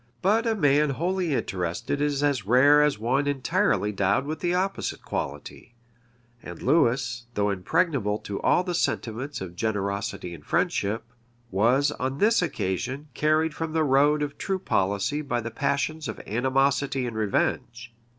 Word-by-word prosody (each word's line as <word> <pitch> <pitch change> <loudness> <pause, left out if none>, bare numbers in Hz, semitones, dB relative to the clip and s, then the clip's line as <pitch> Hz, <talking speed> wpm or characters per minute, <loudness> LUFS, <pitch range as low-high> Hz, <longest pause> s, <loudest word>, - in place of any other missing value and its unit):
But 220 +5 +3
a 225 - +2
man 150 -4 +3
wholly 175 +2 -1
interested 90 +8 -2
is 145 -1 0
as 140 -6 +1
rare 140 +5 +6
as 150 -4 +2
one 130 +6 0
entirely 145 - +1
endowed 100 +6 +1
with 155 +2 -4
the 175 - 0
opposite 190 +2 -2
quality; 120 - -6 0.7
and - - -9
Lewis, 120 -4 +1
though 105 0 +1
impregnable 105 - 0
to 100 -2 -6
all 180 - +3
the 180 -1 -3
sentiments 130 - -2
of 90 -2 -7
generosity 100 -2 -2
and 75 -3 -11
friendship, 105 +8 0 0.5
was, 120 +9 +3
on 130 +1 -3
this 215 +6 +3
occasion, 130 - -3
carried 155 +3 +1
from 160 0 -4
the 160 -1 +2
road 145 +2 +3
of 145 -1 -5
true 195 -1 -1
policy 100 - 0
by 140 -5 -2
the 115 0 -5
passions 150 +4 -1
of - - -6
animosity 135 +3 +1
and 120 -2 -5
revenge. 115 +3 -1
135 Hz, 150 wpm, -26 LUFS, 110-150 Hz, 0.7 s, rare